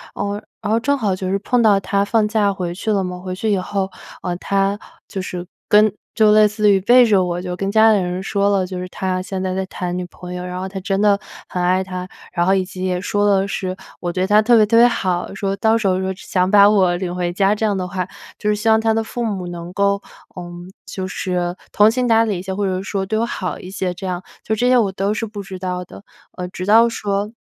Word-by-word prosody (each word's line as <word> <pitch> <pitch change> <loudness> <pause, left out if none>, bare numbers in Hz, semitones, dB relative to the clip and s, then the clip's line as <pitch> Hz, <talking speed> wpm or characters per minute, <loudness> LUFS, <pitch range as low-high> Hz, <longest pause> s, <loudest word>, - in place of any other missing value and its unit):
呃， 205 +1 -3 0.2
然 210 - -1
后 225 - +3
正 285 +4 +1
好 205 -7 0
就 185 0 -4
是 195 - +1
碰 245 +4 +1
到 210 -3 +5
他 200 +1 0
放 215 +1 +2
假 210 -2 +2
回 180 -3 -4
去 210 +4 -2
了 200 -2 +1
嘛， 180 0 -5
回 185 0 -5
去 215 +3 -1
以 200 - +2
后， 190 +1 -2 0.3
呃， 175 - -2
他 195 +1 0 0.3
就 195 - -4
是 180 -1 -5 0.2
跟 210 -1 +5 0.2
就 215 -1 +5
类 215 0 +6
似 210 0 +2
于 195 - +4
背 245 +4 +6
着 200 -5 +3
我， 175 0 -2
就 180 -1 -4
跟 195 +2 -2
家 220 +1 +6
里 205 - +3
人 180 0 -2
说 200 +1 +1
了， 195 -2 +2
就 180 0 -6
是 180 - -5
他 185 0 -2
现 190 0 -4
在 185 - -1
在 190 0 -1
谈 180 -1 -4
女 180 - -3
朋 180 0 -10
友， 180 0 -5
然 180 0 -5
后 190 - -3
他 190 0 -6
真 195 +1 -1
的 205 -1 +4 0.3
很 180 - -3
爱 185 +1 +2
她， 185 -1 -6 0.3
然 175 -1 +1
后 190 - +4
以 190 - +1
及 185 0 -7
也 180 -1 0
说 205 +2 0
了 195 -1 +3
是 185 -1 -3 0.2
我 175 - -3
对 185 +1 0
他 210 +1 +5
特 235 +2 +4
别 215 - +6
特 230 +2 +2
别 240 +1 +8
好， 185 -7 -1
说 195 0 -2
到 220 +2 +3
时 215 -3 0
候 185 0 +2
说 190 0 -2
想 185 -1 -1
把 200 0 +7
我 190 -4 +3
领 180 -1 -3
回 175 -1 -1
家 195 +2 +3
这 220 - -1
样 205 -2 +1
的 185 -1 -3
话， 185 0 -3 0.3
就 210 - -1
是 210 - +2
希 210 +2 -3
望 220 0 +5
他 225 0 +2
的 225 - 0
父 240 +2 -4
母 195 -5 -3
能 175 0 -7
够， 200 +1 +1 0.3
呃， 180 - -6 0.4
就 190 - -5
是 180 -2 -2 0.2
通情达理 225 -2 +3
一 - - -5
些， 190 +1 -5
或 205 +1 -1
者 185 -1 -1
说 195 0 -2
对 220 +3 -1
我 230 - +1
好 185 -5 -4
一 180 - -9
些 185 -2 -2
这 190 +2 -7
样， 180 0 -3 0.2
就 220 - -1
这 245 +3 +1
些 255 - +5
我 210 -5 +2
都 195 +2 0
是 220 +1 -2
不 205 -2 -7
知 190 -1 -8
道 180 -1 -3
的， 195 - -13 0.3
呃， 180 - -4
直 185 0 -6
到 225 +3 +6
说 205 -2 -2
195 Hz, 285 characters per minute, -19 LUFS, 185-210 Hz, 0.4 s, 别